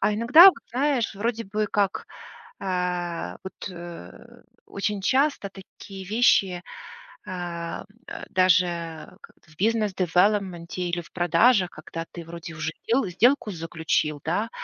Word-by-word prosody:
А 210 - +2
иногда, 240 - +7
вот 370 - +7
знаешь, 255 -2 0
вроде 230 +3 -2
бы 210 +2 -2
как, 200 -2 0 0.5
а, 180 -2 -3
вот, 190 +1 -8
э, 175 - -11 0.2
очень 200 0 -3
часто 265 -1 +1
такие 195 0 -11
вещи, 195 -4 +3 0.6
а, 175 -3 -5
м, - - -12 0.2
а, - - -7
даже 170 -3 +1
как - - -16
в 155 - -20
бизнес-девелопменте 190 -4 +1
или 175 - 0
в 170 - -17
продажах, 180 +3 +3
когда 165 +2 -7
ты 170 - -8
вроде 170 0 -8
и - - -11
уже 155 +1 -3 0.2
дел 235 +1 +2
сделку 235 +4 +2
заключил, 160 -3 -2
да, 205 +8 -1
185 Hz, 135 wpm, -25 LUFS, 170-215 Hz, 0.6 s, иногда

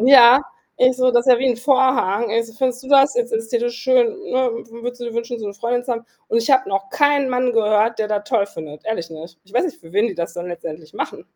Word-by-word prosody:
Ja, 255 +1 +8 0.3
ich 255 0 +4
so, 255 0 +2
das 240 +1 +2
ist 255 - +7
ja 240 - +3
wie 265 - 0
'n 240 - 0
Vorhang. 250 -5 +1
„Also, 230 0 -1
findest 250 +2 -2
du 260 - -12
das 275 -1 +5
i - - +4
ist 240 - -5
ist 225 0 -3
dir 235 -2 0
das 240 0 -1
schön, - - +3 0.2
ne? 255 -1 +1
W 230 0 -10
würdest 245 +1 -6
du 240 - -5
dir 230 - -6
wünschen, 235 0 -4
so 215 - -6
'ne 200 - -6
Freundin 240 +3 -2
zu 250 - -2
haben?“ 230 0 -5 0.2
Und - - 0
ich 230 +3 +1
habe 260 -6 +3
noch 195 0 -3
keinen 285 -2 +2
Mann 250 0 0
gehört, 215 +1 +2
der 215 - 0
das 210 -1 -2
toll 225 -3 +1
findet, 155 -6 -10
ehrlich 220 -7 -3
nicht. 165 +1 -11
Ich 195 +4 -21
weiß 250 - +2
nicht, 345 - -5
für 165 0 -16
wen 210 +3 +3
die 200 - -6
das 170 -1 -5
dann 175 0 -6
letztendlich 160 -2 -8
machen. - - -6
235 Hz, 280 wpm, -20 LUFS, 205-255 Hz, 0.3 s, Ja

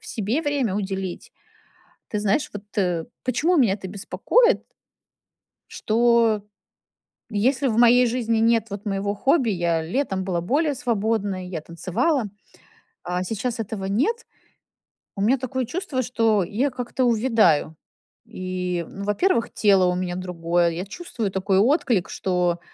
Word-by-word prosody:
в - - -15
себе 230 +9 -2
время 280 -9 0
уделить. 190 -3 -4 0.8
Ты 210 - -2
знаешь, 205 +7 0
вот, 205 0 -8
э, 180 -5 0 0.2
почему 325 +8 +1
меня 225 -9 +4
это 190 - -8
беспокоит? 470 - +2 1.0
Что 230 -1 +2 0.9
если 250 +6 +1
в 220 - -1
моей 245 +1 +6
жизни 230 -2 0
нет, 225 -1 +2
вот, 200 +1 -7
моего 200 0 -1
хобби, 265 +2 +2
я 170 -3 0
летом 190 - -2
была 180 -3 -1
более 285 - +1
свободной, 215 -7 -1
я 170 -4 -4
танцевала, 185 - -1 0.8
а 180 +1 -2
сейчас 225 +5 -3
этого 205 -2 -4
нет, 290 - 0 0.9
у 195 - -2
меня 250 +5 +3
такое 260 0 -2
чувство, 260 -1 -3
что 225 -5 +1
я 235 +10 -1
как-то 250 0 -2
увядаю. 225 - +3 0.5
И, 180 -1 -3
ну, 200 - -7
во-первых, 230 - +1
тело 195 -3 +4
у 180 - +1
меня 180 -1 -2
другое. 175 -1 0
Я 170 +2 -4
чувствую 225 - -4
такой 190 0 +1
отклик, 240 - +2
что 180 -2 0
210 Hz, 135 wpm, -23 LUFS, 185-250 Hz, 1.0 s, моей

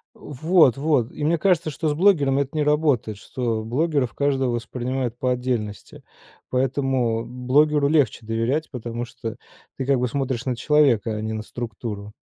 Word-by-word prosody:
Вот 150 -2 +3
вот! 140 -5 +1
И 150 - -6
мне 165 +2 +2
кажется, 170 -2 +2
что 155 +2 -2
с - - +1
блогерами 145 -6 +3
это 140 +2 -5
не 150 - +2
работает, 145 -8 +1
что 115 0 -3
блогеров 135 +2 0
каждого 135 -3 0
воспринимают 120 +1 -3
по 125 - +1
отдельности. 125 -5 -3 0.5
Поэтому 130 -3 0
блогеру 140 +4 +2
легче 140 -7 +1
доверять, 115 +8 -1
потому 120 -1 -5
что 115 -1 -7 0.4
ты 130 - -3
как 135 -2 +2
бы 125 - +1
смотришь 130 -1 -2
на 130 - -1
человека, 120 -5 +2
а 105 - -4
не 110 0 -3
на 110 - -4
структуру. 105 -3 -6
130 Hz, 160 wpm, -23 LUFS, 115-145 Hz, 0.5 s, Вот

